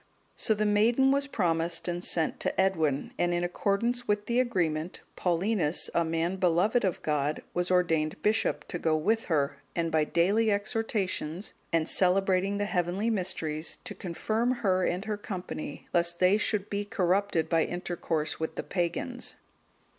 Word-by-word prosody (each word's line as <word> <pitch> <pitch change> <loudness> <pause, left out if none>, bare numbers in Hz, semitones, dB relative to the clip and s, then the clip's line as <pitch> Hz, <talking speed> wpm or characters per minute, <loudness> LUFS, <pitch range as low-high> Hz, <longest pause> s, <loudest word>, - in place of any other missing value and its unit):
So 220 - +1
the 215 +1 0
maiden 230 +6 +4
was 280 0 +1
promised, 170 -8 0
and 175 0 -2
sent 160 -2 0
to - - -2
Edwin, 160 -7 +1
and 175 0 +2
in 175 - 0
accordance 220 +7 0
with 205 0 +1
the 235 +1 +1
agreement, 175 -9 -1
Paulinus, 180 -2 0
a 170 - +3
man 165 +3 -1
beloved 185 +6 +2
of 185 -4 -1
God, 150 0 0
was 180 0 -1
ordained 165 -4 +1
bishop, 220 +2 +1
to 175 - -3
go 160 -1 +2
with 220 +8 +1
her, 140 -4 0 0.2
and 165 -1 0
by 155 -1 +3
daily 200 +8 +2
exhortations, 200 -4 -2 0.2
and 165 -1 +1
celebrating 190 +1 +3
the 205 - 0
heavenly 190 +3 0
Mysteries, 165 -6 -2
to - - -5
confirm 215 +7 -1
her 185 -1 +3
and 180 +4 -1
her 215 -1 -2
company, 180 -7 -6
lest 170 0 +2
they 185 +4 +4
should 210 -1 -1
be 205 0 -2
corrupted 195 -4 +1
by 165 -1 +3
intercourse 170 -3 -3
with 160 - -3
the - - -3
pagans. 190 +8 -2
180 Hz, 160 wpm, -29 LUFS, 165-205 Hz, 0.2 s, maiden